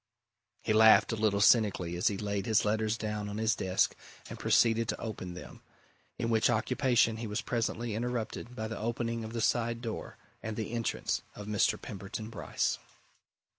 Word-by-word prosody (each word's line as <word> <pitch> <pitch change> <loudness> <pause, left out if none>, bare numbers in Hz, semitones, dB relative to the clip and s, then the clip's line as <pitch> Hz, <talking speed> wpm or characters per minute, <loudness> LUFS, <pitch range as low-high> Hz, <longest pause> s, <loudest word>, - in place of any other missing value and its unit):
He 110 - +1
laughed 110 +2 +7
a - - 0
little 105 -2 +1
cynically 100 -7 +4
as 90 - +1
he 100 -3 +1
laid 100 -1 -2
his 110 -1 +3
letters 110 +1 +1
down 105 -2 -3
on 105 - -5
his 110 0 +2
desk 95 0 +1 0.3
and - - -8
proceeded 115 -1 +3
to - - -2
open 95 -5 -6
them 90 - -10 0.6
in 115 - -1
which 110 -1 +3
occupation 120 0 +2
he 115 0 -4
was 105 0 -2
presently 115 -1 -2
interrupted 120 +1 -3
by 110 -1 -3
the 110 - -5
opening 115 0 -2
of 110 +1 -7
the 115 - -2
side 115 +1 +1
door 115 -2 -6 0.2
and 110 +1 -5
the 110 -1 -3
entrance 115 -1 -1
of 105 - -8
Mr. 105 -1 +1
Pemberton 110 +1 -7
Bryce. 110 - -1
110 Hz, 175 wpm, -31 LUFS, 105-115 Hz, 0.6 s, laughed